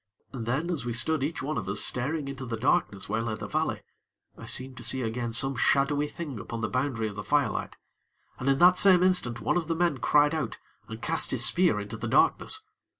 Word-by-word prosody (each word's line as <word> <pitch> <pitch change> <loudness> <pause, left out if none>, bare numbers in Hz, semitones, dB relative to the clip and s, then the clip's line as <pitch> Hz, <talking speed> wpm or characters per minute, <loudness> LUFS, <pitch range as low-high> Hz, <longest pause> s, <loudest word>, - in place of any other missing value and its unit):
And 115 -4 -6
then, 150 +9 -1
as 160 -7 -2
we 120 -1 -3
stood 130 +5 +1
each 145 0 -3
one 155 +3 -2
of - - -6
us 100 +1 0
staring 140 +4 0
into 135 -1 -6
the 120 -3 -4
darkness 110 - 0
where 110 +2 -1
lay 115 -1 -3
the - - -7
valley, - - -2 0.5
I - - -11
seemed 130 0 0
to 120 - -8
see 125 +2 +1
again 120 +1 -3
some 135 +4 +2
shadowy 145 +4 +2
thing 145 -7 -7
upon 115 +4 -6
the - - -2
boundary 125 -3 -1
of 105 - -6
the 105 - -6
firelight; 145 -7 -1 0.6
and, 130 - -1
in 135 - +3
the 175 +4 +7
same 180 -1 +5
instant, 180 -11 +2
one - - +1
of 165 -3 -2
the 165 - -1
men 170 -5 0
cried 145 +4 +3
out 160 - -3 0.3
and - - -9
cast - - 0
his - - +2
spear - - +3
into - - -6
the - - -5
darkness. 435 - +2
135 Hz, 225 wpm, -27 LUFS, 120-155 Hz, 0.6 s, the